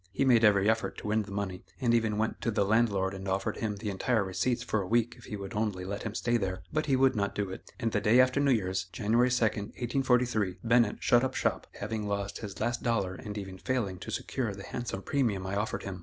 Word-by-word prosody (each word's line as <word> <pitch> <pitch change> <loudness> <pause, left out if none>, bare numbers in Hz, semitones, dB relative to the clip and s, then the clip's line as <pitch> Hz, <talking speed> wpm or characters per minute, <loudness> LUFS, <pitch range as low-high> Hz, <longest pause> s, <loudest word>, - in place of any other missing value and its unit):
He 120 +8 +1
made 120 -3 +5
every 100 -2 +5
effort 110 0 +1
to - - -6
win 110 +1 +2
the 100 - -8
money, 100 -2 -3 0.2
and 120 -3 +2
even 110 -3 +2
went 110 +1 -1
to - - 0
the 105 -3 +1
landlord 100 -3 +2
and 95 0 -6
offered 95 0 -1
him 105 -2 -2
the 105 +1 -4
entire 110 +3 +1
receipts 120 +6 -1
for 110 -3 0
a 95 - -5
week 120 +2 +2
if 120 - -15
he - - -5
would 100 -1 -7
only 105 -4 -1
let 100 +2 -4
him 110 -1 -5
stay 120 +1 +1
there; 95 -3 -3
but 155 0 0
he 135 - +3
would 130 0 +4
not 100 -1 -1
do 100 -2 -2
it, - - -9
and 115 - 0
the - - 0
day 115 +4 +5
after 130 +2 +4
New 145 -1 +3
Year's, 95 -5 0
January 110 +7 +2
2, 125 -1 +2
1843, 120 -1 0
Bennett 115 -2 +3
shut 120 +1 +5
up 130 0 -1
shop, - - 0
having 105 0 -3
lost 100 0 -3
his 100 -5 -7
last 120 +2 -1
dollar 100 -6 0
and 105 +2 -7
even 95 -2 -6
failing 110 -8 -1
to - - -8
secure 115 -7 -2
the 100 - -9
handsome 115 -3 -5
premium 115 -10 0
I 95 +1 -2
offered 105 +2 -2
him. 95 -2 -5
105 Hz, 245 wpm, -30 LUFS, 100-120 Hz, 0.2 s, made